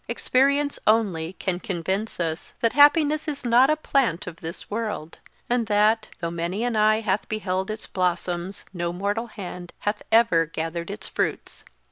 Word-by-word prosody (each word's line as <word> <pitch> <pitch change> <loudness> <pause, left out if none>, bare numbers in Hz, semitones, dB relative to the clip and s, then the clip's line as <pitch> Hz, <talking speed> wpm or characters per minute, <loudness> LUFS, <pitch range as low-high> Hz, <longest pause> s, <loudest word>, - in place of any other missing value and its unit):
Experience 280 +2 +1
only 190 -7 +2
can 185 -1 -3
convince 190 +4 -3
us 165 -2 -3
that 230 - +1
happiness 300 +2 +5
is 285 -4 -4
not 245 +3 +5
a 310 - +4
plant 270 - 0
of 170 -2 -8
this 165 +2 -4
world; 210 -7 -4 0.3
and 240 -2 0
that, 215 +1 +3
though 170 -1 -3
many 170 +6 -2
an 240 -2 0
eye 215 +1 +4
hath 205 -2 -1
beheld 190 -3 -2
its 215 0 -5
blossoms 180 0 -2
no 175 -1 -2
mortal 205 +6 -2
hand 180 -5 -8
hath 205 +1 -1
ever 220 -8 +4
gathered 165 +1 -4
its - - -5
fruits. - - -3
205 Hz, 160 wpm, -24 LUFS, 175-230 Hz, 0.3 s, happiness